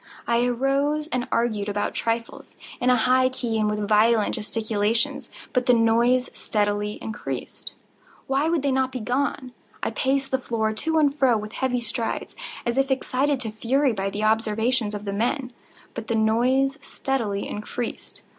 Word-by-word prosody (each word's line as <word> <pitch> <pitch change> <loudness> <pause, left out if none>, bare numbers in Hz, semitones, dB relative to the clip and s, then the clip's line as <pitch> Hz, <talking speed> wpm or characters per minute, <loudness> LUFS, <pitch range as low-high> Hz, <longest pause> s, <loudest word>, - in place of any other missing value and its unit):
I 235 0 +2
arose 275 +5 +1
and 255 -3 -2
argued 215 -3 0
about 205 0 -1
trifles, 230 0 -3 0.2
in 250 - +2
a 250 - +6
high 255 +2 +3
key 240 -3 -2
and 210 -1 +2
with 210 -1 -2
violent 215 +1 +4
gesticulations; 225 +4 0 0.2
but 250 0 +1
the 250 - +6
noise 235 +2 +3
steadily 205 0 -1
increased. 220 -1 -6 0.5
Why 275 +4 +1
would 330 -4 +1
they 280 - +2
not 260 0 +1
be 255 - -4
gone? 255 +2 -1 0.3
I - - 0
paced 270 +4 0
the 265 - +2
floor 220 -3 -1
to 320 +9 0
and 290 -3 +4
fro 265 -5 +3
with 215 0 -6
heavy 250 -2 0
strides, 230 0 -3 0.3
as 235 +2 +1
if 270 0 +2
excited 270 +1 +1
to 225 -3 -3
fury 255 +5 +1
by 195 -1 -2
the 205 +2 -4
observations 220 +1 +1
of 205 0 -6
the 200 - -2
men—but 240 -1 -4
the 230 - 0
noise 255 +6 +2
steadily 230 -8 -2
increased. 220 +3 -6
235 Hz, 165 wpm, -24 LUFS, 220-265 Hz, 0.5 s, a